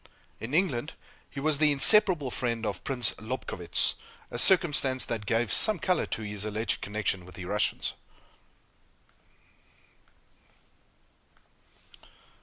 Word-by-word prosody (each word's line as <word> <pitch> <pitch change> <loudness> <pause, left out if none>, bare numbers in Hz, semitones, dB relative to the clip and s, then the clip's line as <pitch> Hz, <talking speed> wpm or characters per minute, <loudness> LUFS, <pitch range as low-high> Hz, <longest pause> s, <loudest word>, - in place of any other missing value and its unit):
In 125 +6 -6
England, 160 -6 -2 0.3
he 140 - -9
was 150 0 0
the 155 -1 +2
inseparable 155 - +6
friend 115 -2 -4
of 100 -4 -5
Prince 125 -4 -1
Lobkowitz 110 -7 -3 0.4
a - - -6
circumstance 145 -8 +3
that 110 -3 -6
gave 115 0 -1
some 215 -3 +6
color 180 +2 -2
to 110 - -5
his 105 -1 -5
alleged 110 +1 -3
connection 100 -3 -4
with 90 +1 -15
the 90 - -9
Russians. 105 +3 -2
120 Hz, 110 wpm, -26 LUFS, 105-150 Hz, 0.4 s, inseparable